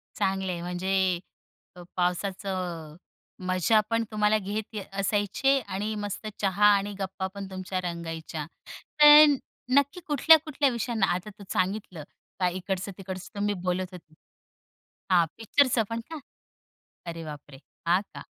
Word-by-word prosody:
चांगलं 190 -1 0
आहे. 170 -1 -4
म्हणजे 185 +1 0 0.6
अ, 180 - -11
पावसाचं 180 -3 -2 0.5
मजा 185 +4 +3
पण 230 0 +1
तुम्हाला 210 0 +3
घेत 210 +2 -5 0.2
असायचे 205 +7 +2
आणि 210 -2 -4
मस्त 205 +1 -5
चहा 200 +1 +2
आणि 200 +1 -2
गप्पा 190 0 -3
पण 200 -1 -6
तुमच्या 185 0 -3
रंगायच्या. 165 -3 -5 0.6
पण 295 0 +10 0.4
नक्की 280 +5 +3
कुठल्या-कुठल्या 300 -1 +4
विषयांना 235 -3 0
आता 185 +4 -5
तू - - -9
सांगितलं, 185 -3 -2 0.4
का 180 -1 +3
इकडचं-तिकडचं 185 +1 -5
तुम्ही 205 0 0
बोलत 185 0 -1
होते. 165 -3 -13 1.0
हां, 175 -2 +5
पिक्चरचं 235 +1 +3
पण 230 0 -2
का? 320 -1 -6 0.9
अरे 165 -1 -6
बापरे! 145 -2 -10 0.3
हां 175 +2 +4
का? - - -8
195 Hz, 125 wpm, -27 LUFS, 180-215 Hz, 1.0 s, पण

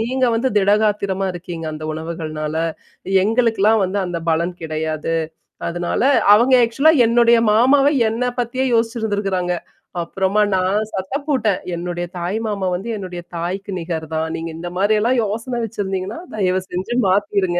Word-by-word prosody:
நீங்க 255 +3 0
வந்து 240 +4 +1
திடகாத்திரமா 200 -1 +1
இருக்கீங்க 170 -2 -6
அந்த 155 0 -7
உணவுகள்னால. 155 -1 -4 0.7
எங்களுக்குலாம் 225 -2 +3
வந்து 190 +2 -2
அந்த 170 -1 -4
பலம் 170 +2 0
கிடையாது. 155 0 -2 0.6
அதனால" 175 0 -2 0.3
அவங்க 245 +4 +3
ஆக்சுவலா 275 +8 +3
என்னுடைய 235 0 +5 0.2
மாமாவ 270 +5 +5 0.2
என்ன 230 +3 -2 0.2
பத்தியே 255 +3 -2
யோசிச்சிருந்திருக்கறாங்க. 205 -6 0 0.5
அப்புறமா 190 +4 0
நான் 190 +3 +1
சத்தம் 230 +10 -3
போட்டேன், 220 -9 +1 0.2
"என்னுடைய 175 0 -3
தாய் 175 +4 -2
மாமா 200 -3 -2
வந்து 195 +6 -5
என்னுடைய 180 -3 -6
தாய்க்கு 185 +4 -4
நிகர் 165 -2 -4
தான். 160 0 0
நீங்க 165 +1 -4
இந்த 175 +1 -5
மாரியெல்லாம் 215 +5 +2
யோசனை 230 +4 -3
வச்சிருந்தீங்கன்னா, 195 - -4 0.2
தயவுசெஞ்சு 185 +2 -1
மாத்திருங்க. 195 -2 +1
195 Hz, 130 wpm, -20 LUFS, 175-225 Hz, 0.7 s, என்னுடைய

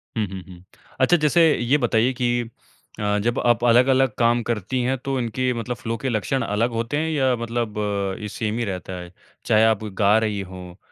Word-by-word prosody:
हुँ, 110 -2 0
हुँ, 95 - -6
हुँ। 90 -1 -13 0.4
अच्छा 175 +7 +5
जैसे 155 +2 +3 0.2
ये 120 +5 +2
बताइए 120 -2 +1
कि 120 -1 0 0.5
अ, 105 0 0
जब 120 +2 0
आप 120 -1 +3
अलग-अलग 130 +1 +4
काम 120 0 +3
करती 120 +3 -2
है 130 +2 +1
तो 135 +1 -3
इनके 125 +2 -1
मतलब 120 +1 -4
फ्लो 115 -1 -4
के 135 - 0
लक्षण 120 +4 -1
अलग 105 +4 0
होते 115 +5 -2
हैं 160 +2 -1
या 130 -4 +2
मतलब 115 -2 -3 0.5
ये 105 - -4
सेम 110 +1 -3
ही 120 - -1
रहता 95 -2 -5
है? 90 0 -10 0.3
चाहे 110 +1 +4
आप 110 -1 +2 0.2
गा 105 +2 +5
रही 105 -2 -1
हो, 90 -1 -10
115 Hz, 200 wpm, -22 LUFS, 105-125 Hz, 0.5 s, अच्छा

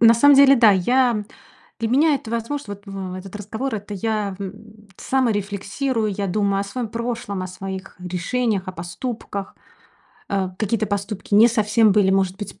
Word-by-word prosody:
На 230 0 +7
самом 285 +5 +6
деле- 275 0 +7
да, 230 -3 +7
я 235 +3 +2 0.5
для 225 -1 -1
меня 290 +6 +4
это 250 -5 -5
возможно. 230 -1 -3
Вот 200 +1 -19
в 195 -2 -6
этот 185 +1 -9
разговор- 220 +5 -4
это 205 0 -6
я, 210 0 -2
м, 210 +2 -10
саморефлексирую, 215 0 -1
я 200 +1 -2
думаю 200 +1 +1
о - - -2
своем 230 +4 -4
прошлом, 230 -4 -4
о - - -3
своих 190 +1 -7
решениях, 190 +4 -1
о - - -4
поступках. 195 +3 -6 0.7
Э, 195 -2 0
какие-то 215 0 0
поступки 200 0 -3
не 215 +3 +8
совсем 215 -1 +3
были, 195 -2 +4
может 190 -1 +1
быть, 200 -1 -8
210 Hz, 165 wpm, -22 LUFS, 195-230 Hz, 0.7 s, не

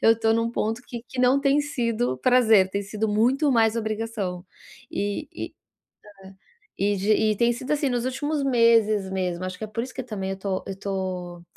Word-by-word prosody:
eu 225 0 +5
tô 225 0 +2
num 230 +1 +1
ponto 225 0 -2
que 235 -2 -8
que 255 - -4
não 255 +2 +4
tem 280 +1 +3
sido 240 - -1
prazer, 220 - +4
tem 200 - -1
sido 215 +2 -2
muito 255 +7 +2
mais 225 -1 +3
obrigação, 215 -5 -3 0.5
e 205 0 -3
e - - -2 1.1
é 205 - -2
e - - -2
de 205 +3 +2
e 215 0 +2
tem 235 0 +3
sido, 255 +4 -6
assim, 290 -2 0
nos 245 -1 -1
últimos 290 +3 -1
meses 230 -6 +3
mesmo. 185 -2 -2
Acho 185 0 -5
que - - -8
é - - -11
por 220 +2 -3
isso 260 - -9
que 260 - -5
também 195 -5 -4
eu 190 - -4
tô 190 -1 -2
eu 195 - -4
tô 185 -3 -4
225 Hz, 200 wpm, -25 LUFS, 195-245 Hz, 1.1 s, eu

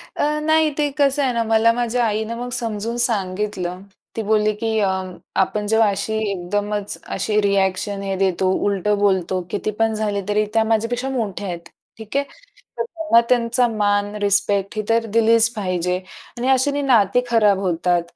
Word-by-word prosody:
अ, 300 +1 0
नाही 315 0 +3
ते 295 -1 +1
कसं 285 0 +2
आहे 260 -2 +1
ना, 230 -1 0
मला 225 +1 +3
माझ्या 240 0 0
आईनं 220 +1 -2
मग 245 +1 -5
समजून 230 -1 -3
सांगितलं. 195 -5 -2 0.3
ती 225 - -2
बोलली, 215 0 +2
की 220 0 -1
अ, 200 -2 +2 0.5
आपण 210 +2 -1
जेव्हा 220 0 +3
अशी 200 +2 -2
एकदमच, 205 +3 -3 0.2
अशी 210 -1 0
रिएक्शन 200 0 0
हे 195 -1 -2
देतो, 185 -1 +1
उलटं 205 +1 +1
बोलतो, 190 -2 +1
कितीपण 215 +2 -1
झाले 210 -2 -1
तरी 210 +1 +2
त्या 225 -1 +3
माझ्यापेक्षा 230 +4 -1
मोठ्या 210 -6 -3
आहेत. 170 -2 -6 0.3
ठीक 220 +3 -5
आहे. 280 - +2 0.5
तर - - -1
त्यांना 325 - +2
त्यांचा 245 0 +2
मान, 205 -2 0
रिस्पेक्ट 200 0 +1
ही 215 - +1
तर 230 0 +2
दिलीच 230 +1 +4
पाहिजे 180 -3 -1 0.4
आणि 245 - -2
अश्याने 280 +2 +2
नाती 245 -4 +3
खराब 210 -4 +3
होतात. 175 -1 +1
215 Hz, 160 wpm, -21 LUFS, 200-230 Hz, 0.5 s, दिलीच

